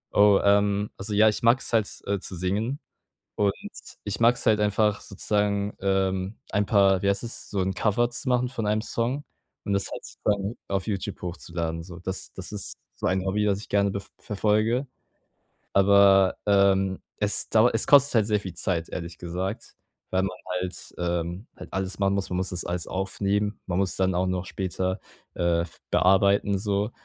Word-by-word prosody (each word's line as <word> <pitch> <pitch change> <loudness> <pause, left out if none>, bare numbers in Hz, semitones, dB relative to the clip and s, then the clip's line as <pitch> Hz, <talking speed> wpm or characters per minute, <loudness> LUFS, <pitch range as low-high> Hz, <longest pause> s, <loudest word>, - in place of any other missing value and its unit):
Oh, 100 -1 +6
ähm, 100 0 +3
also, 100 +2 -5
ja, 105 +2 +5
ich 105 - +1
mag's 120 +1 +2
halt, 110 -3 +3 0.2
äh, 100 0 -1
zu 90 - -7
singen 105 - -1 0.6
und 100 -1 +2 0.5
ich 105 +2 -4
mag's 120 +1 +4
halt 105 -1 +3
einfach 105 0 +2
sozusagen, 100 +1 -1
ähm, 95 +1 0
ein 100 -1 +1
paar, 95 -2 +4
wie 100 - 0
heißt 100 +3 +1
das, 120 - -6
so 100 - -2
'n 95 +1 0
Cover 120 +4 +1
zu 130 +2 -4
machen 125 0 +1
von 115 -5 -3
einem 105 +1 +1
Song 125 +5 -2 0.4
und 100 - -2
das 100 - -1
halt - - -6 0.2
dann 100 +1 0
auf 95 -1 -1
YouTube 100 -4 -4
hochzuladen, 85 -2 -4
so. 85 0 -10
Das 95 +1 -5
das 95 +2 -7
ist 105 -2 -6 0.2
so - - -3
ein 95 0 +1
Hobby, 105 +2 0
das 100 -1 +1
ich 105 - -11
gerne 100 0 +2
bef 100 0 -6
verfolge. 110 +4 +1 0.9
Aber, 100 -1 +5
ähm, 95 -1 +3 0.2
es 105 0 +1
dauert 115 +2 +5
es - - 0
kostet 140 -3 +6
halt 105 -2 +4
sehr 105 -2 +1
viel 95 -4 -7
Zeit, 85 -1 -1
ehrlich 85 -1 -6
gesagt, 90 +5 -5 0.3
weil 95 0 +1
man 95 -1 -3 0.2
halt, 90 0 -5
ähm 85 +3 -2
halt - - -11
alles 95 +1 -3
machen 100 0 +2
muss, 100 -1 -2
man 90 - -1
muss 95 - -1
das 90 - -3
alles 90 -1 -3
aufnehmen. 100 +2 -1
Man 90 -1 -1
muss 95 -2 0
dann 95 -1 +1
auch 95 +1 +1
noch 90 0 -1
später, 95 +1 -2 0.4
äh, 85 -1 +2
f 85 -1 -7
bearbeiten 100 +1 +4
so 100 +1 -1
100 Hz, 185 wpm, -26 LUFS, 95-105 Hz, 0.9 s, Oh